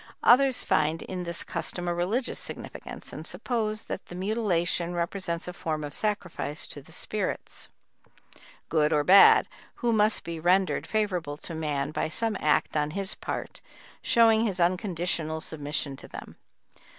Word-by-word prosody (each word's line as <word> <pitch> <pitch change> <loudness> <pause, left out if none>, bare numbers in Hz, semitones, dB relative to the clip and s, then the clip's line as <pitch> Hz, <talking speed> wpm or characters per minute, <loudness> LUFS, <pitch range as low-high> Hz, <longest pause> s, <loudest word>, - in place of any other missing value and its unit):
Others 260 +1 +5
find 155 +1 +1
in 180 -1 -5
this 170 0 -2
custom 175 +1 0
a 175 - +1
religious 195 +9 -1
significance - - -8
and - - -4
suppose 215 -3 -1
that - - -6
the 175 - -9
mutilation 180 -4 0
represents 170 0 -2
a 180 - -5
form 155 -3 -3
of 145 0 -6
sacrifice 185 -7 -1
to 145 - -8
the - - -18
spirits, - - -3 1.0
good 150 -1 +2
or 150 -1 +3
bad, 195 +5 +8 0.3
who 240 -2 0
must 215 0 +2
be 170 -1 -5
rendered 180 -2 +2
favorable 180 -9 -1
to 165 - -8
man 150 -3 -2
by 155 - -2
some 225 +5 -1
act 150 +1 +1
on 150 -1 +1
his 195 0 -2
part - - -6 0.4
showing 225 -1 +4
his 190 -3 -3
unconditional 170 -3 0
submission 145 -3 -3
to - - -11
them. - - -10
175 Hz, 150 wpm, -27 LUFS, 155-210 Hz, 1.0 s, bad